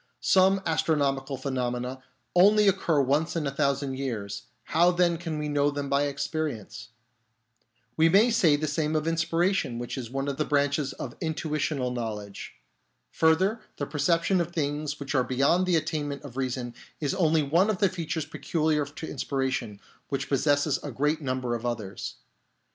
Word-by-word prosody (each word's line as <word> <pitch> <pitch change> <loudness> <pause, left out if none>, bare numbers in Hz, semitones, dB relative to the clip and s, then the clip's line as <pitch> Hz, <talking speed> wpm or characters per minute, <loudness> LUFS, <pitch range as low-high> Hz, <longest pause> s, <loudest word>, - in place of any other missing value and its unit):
Some 190 0 +4
astronomical 140 -4 0
pheno 130 -2 -2
mena 125 +2 -5 0.3
only 205 +3 +6
occur 175 -5 +2
once 145 +6 +1
in 165 -3 -1
a 140 - -1
thousand 140 -1 -1
years; 115 -4 -4 0.2
how 170 +2 +3
then 175 -1 +2
can 165 -3 -4
we 150 0 -2
know 145 -1 +2
them 145 -1 -4
by 140 +1 +2
experience? 140 -6 -4 1.1
We 160 +1 +5
may 210 +7 +5
say 170 -9 +4
the 150 +1 -2
same 150 +1 -1
of 155 0 0
inspiration, 165 -3 +1
which 120 +3 -4
is 120 -3 -6
one 135 +2 -3
of 140 -1 -2
the 155 - +1
branches 145 -1 +1
of 120 - -7
intuitional 155 -4 -1
knowledge. 105 - -5 0.6
Further, 185 +8 +2 0.2
the 145 - -2
perception 165 +5 +1
of 170 0 -3
things 150 -2 -2
which 140 0 -4
are 130 -3 +3
be 130 - -4
yond 170 +8 +3
the 180 - +3
attainment 150 -2 -2
of 135 -4 -10
reason 125 -2 -3 0.3
is 145 -3 -1
only 160 -3 +2
one 170 +9 +3
of 215 - +1
the 200 - +3
features 165 -3 -3
peculiar 155 -2 0
to 150 +3 -8
inspiration, 130 -6 -2 0.3
which 140 - -2
possesses 145 +1 +2
a 145 - -5
great 150 +6 0
number 130 -3 -2
of 115 -1 -3
others. 110 -5 -4
145 Hz, 170 wpm, -27 LUFS, 135-160 Hz, 1.1 s, only